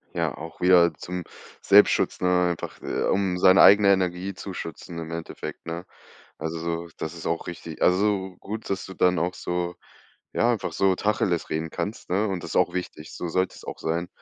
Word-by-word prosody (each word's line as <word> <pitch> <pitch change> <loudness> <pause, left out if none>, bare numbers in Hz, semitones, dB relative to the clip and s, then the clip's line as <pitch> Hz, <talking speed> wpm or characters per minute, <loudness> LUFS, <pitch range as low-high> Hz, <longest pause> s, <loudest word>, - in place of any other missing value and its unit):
Ja, - - -1
auch 80 +2 -9
wieder 90 -2 +6
zum 90 +4 -6 0.4
Selbstschutz, - - +4
ne, 90 -1 +3
einfach, 85 - -6
äh, - - -2
um 95 -2 +1
seine 95 +1 +7
eigene 100 0 +7
Energie 95 0 0
zu 95 - -7
schützen 85 0 -7
im 80 0 -6
Endeffekt, 85 0 -7
ne? 85 +2 -5 0.5
Also, 80 +1 -3
so 85 +1 -3
das 80 +1 -4
ist 85 - -6
auch 85 - -1
richtig. 85 -2 -8
Also, 95 0 +2
gut, 110 +2 -6
dass 95 -1 -2
du 95 - -9
dann 90 -2 +3
auch 90 +2 -1
so, 90 0 -3 0.6
ja, 120 +1 +3
einfach 110 - -2
so 95 -1 +3
Tacheles 100 -5 0
reden 80 +1 -2
kannst, 105 -2 -5
ne? 100 +4 +1
Und 95 -3 -3
das - - -6
ist - - -5
auch - - +3
wichtig, 90 -4 -6
so 90 - -4
sollte 95 +2 0
es - - -13
auch - - -6
sein. 85 +2 -2
90 Hz, 200 wpm, -25 LUFS, 85-95 Hz, 0.6 s, seine